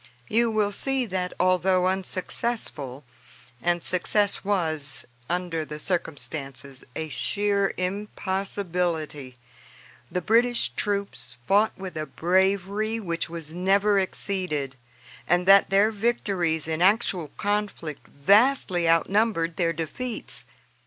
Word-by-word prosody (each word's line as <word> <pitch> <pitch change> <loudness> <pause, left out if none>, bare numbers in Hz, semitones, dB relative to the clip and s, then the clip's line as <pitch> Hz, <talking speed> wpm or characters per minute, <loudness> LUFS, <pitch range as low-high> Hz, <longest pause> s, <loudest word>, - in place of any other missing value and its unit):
You 235 +1 +3
will 215 -2 +1
see 265 +4 0
that, 185 -3 -2
although 185 0 +3
unsuccessful, 185 - -1 0.6
and 175 -1 +1
success 200 +3 +2
was, 160 -9 0 0.2
under 175 -2 -1
the 150 0 -7
circumstances, 140 -5 -3
a 160 - -3
sheer 200 +8 0
impossibility, 180 -7 -2 0.8
the 180 - 0
British 235 +6 +3
troops 200 - -3
fought 205 +3 +3
with 190 -2 -7
a 155 -1 -3
bravery 195 +6 +1
which 170 -5 -3
was 165 -2 -7
never 195 +3 +3
exceeded, 180 -8 -1 0.5
and 175 +1 +2
that 195 +1 +7
their 200 +3 +4
victories 195 -8 0
in 160 +1 -2
actual 190 -4 +2
conflict 205 -7 -3
vastly 195 - +3
outnumbered 170 0 +2
their 170 -1 +1
defeats. 165 - -4
185 Hz, 105 wpm, -25 LUFS, 165-205 Hz, 0.8 s, that